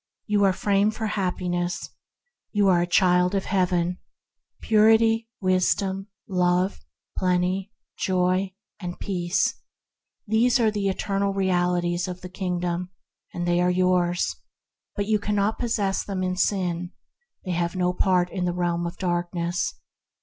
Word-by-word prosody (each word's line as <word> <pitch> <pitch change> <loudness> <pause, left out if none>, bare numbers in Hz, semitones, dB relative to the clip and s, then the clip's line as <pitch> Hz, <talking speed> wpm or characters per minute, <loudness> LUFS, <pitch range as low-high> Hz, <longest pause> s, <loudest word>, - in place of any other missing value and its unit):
You 205 -1 +2
are 195 - +5
framed 200 +3 +1
for 220 -1 -2
Happi 185 -3 -2
ness. 175 0 -2 0.6
You 205 -2 +2
are 175 -2 +4
a 175 - 0
child 180 +1 +3
of 195 - -1
Heaven. 180 -2 0 0.6
Purity, 225 +1 +4
Wisdom, 190 +1 +1 0.2
Love, 180 0 +1 0.4
Plenty, 185 +2 0 0.3
Joy, 185 +1 +1 0.2
and 175 -3 -6
Peace: 175 -2 -1 0.6
these 230 +4 +3
are 225 -2 +3
the 205 -2 -1
eternal 195 +1 -1
Realities 180 -2 +1
of 180 0 -6
the 180 - -8
King 180 -1 -2
dom, 175 +1 -2 0.4
and 175 0 -3
they 175 0 +2
are 180 - +3
yours, 180 -1 +1 0.6
but 205 - -1
you 215 0 +2
cannot 205 +1 0
possess 210 -5 0
them 190 -2 -3
in 185 0 -1
sin; 180 -2 -1 0.5
they 185 - -2
have 170 +1 -1
no 180 -1 +1
part 180 -1 +2
in 180 -2 -2
the 175 - 0
Realm 175 -1 -1
of 170 - -7
Darkness. 175 0 -1
185 Hz, 140 wpm, -25 LUFS, 175-200 Hz, 0.6 s, are